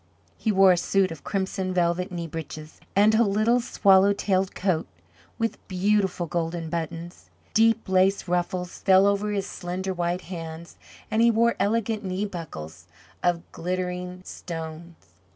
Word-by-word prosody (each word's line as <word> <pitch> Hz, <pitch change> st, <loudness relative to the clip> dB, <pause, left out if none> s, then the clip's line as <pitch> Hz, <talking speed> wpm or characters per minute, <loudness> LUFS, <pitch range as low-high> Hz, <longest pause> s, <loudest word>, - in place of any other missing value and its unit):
He 220 Hz, -, 0 dB
wore 195 Hz, -1 st, +6 dB
a 180 Hz, -, +3 dB
suit 190 Hz, +1 st, +1 dB
of 160 Hz, -4 st, -9 dB
crimson 190 Hz, -1 st, -2 dB
velvet 175 Hz, +2 st, +1 dB
knee 170 Hz, -2 st, -4 dB
breeches, 155 Hz, -1 st, -8 dB, 0.2 s
and 210 Hz, +2 st, +5 dB
a 220 Hz, -, +4 dB
little 215 Hz, +4 st, +2 dB
swallow 195 Hz, -3 st, +4 dB
tailed 195 Hz, -2 st, 0 dB
coat 180 Hz, -4 st, 0 dB, 0.5 s
with 225 Hz, -1 st, -2 dB
beautiful 190 Hz, -1 st, +1 dB
golden 165 Hz, 0 st, -3 dB
buttons. 170 Hz, +1 st, -5 dB, 0.2 s
Deep 225 Hz, 0 st, +3 dB
lace 190 Hz, +1 st, +2 dB
ruffles 180 Hz, 0 st, -2 dB
fell 190 Hz, 0 st, +5 dB
over 200 Hz, +1 st, +1 dB
his 200 Hz, -1 st, -1 dB
slender 185 Hz, 0 st, -4 dB
white 175 Hz, 0 st, -1 dB
hands, 165 Hz, -2 st, -8 dB, 0.4 s
and 220 Hz, +1 st, +2 dB
he 235 Hz, -, +6 dB
wore 235 Hz, +1 st, +3 dB
elegant 215 Hz, +2 st, 0 dB
knee 190 Hz, +2 st, -2 dB
buckles 90 Hz, -, -8 dB, 0.3 s
of 175 Hz, -1 st, +1 dB
glittering 180 Hz, +1 st, -4 dB
stones. 165 Hz, 0 st, -7 dB
185 Hz, 145 wpm, -25 LUFS, 170-200 Hz, 0.5 s, wore